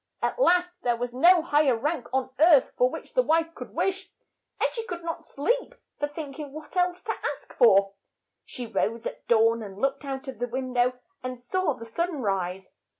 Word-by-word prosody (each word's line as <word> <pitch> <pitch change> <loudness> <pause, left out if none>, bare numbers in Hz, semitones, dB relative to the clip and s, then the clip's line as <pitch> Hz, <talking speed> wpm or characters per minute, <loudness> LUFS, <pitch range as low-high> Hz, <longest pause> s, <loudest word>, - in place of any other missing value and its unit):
At - - -1
last 360 -5 +3
there 240 -1 +1
was 245 0 -4
no 340 +6 +6
high 295 -2 +3
er 240 - +2
rank 295 +2 -2
on 260 0 -1
earth 310 -3 +6
for - - +3
which - - -8
the - - +4
wife 330 -4 +1
could - - -10
wish, 385 0 -1 0.5
and - - +1
she 460 - -3
could 345 -1 -5
not 330 0 -4
sleep 485 - -1 0.2
for 290 - 0
think 290 -1 -8
ing 290 -2 -6
what 310 +2 -10
else 360 0 +1
to - - -1 0.2
ask - - -18
for, 195 -5 +5 0.5
She 245 - -7
rose 225 +1 -1
at - - -6
dawn, 230 0 +4
and 195 -3 -8
looked 275 +5 -1
out 270 0 -5
of 260 -5 -7
the 245 - -1
win 255 +1 -4
dow, 245 0 +3 0.3
and 255 -1 -6
saw 370 +2 0
the 230 -3 -10
sun 335 +7 -2
rise. 190 -4 -2
275 Hz, 210 wpm, -26 LUFS, 240-340 Hz, 0.5 s, no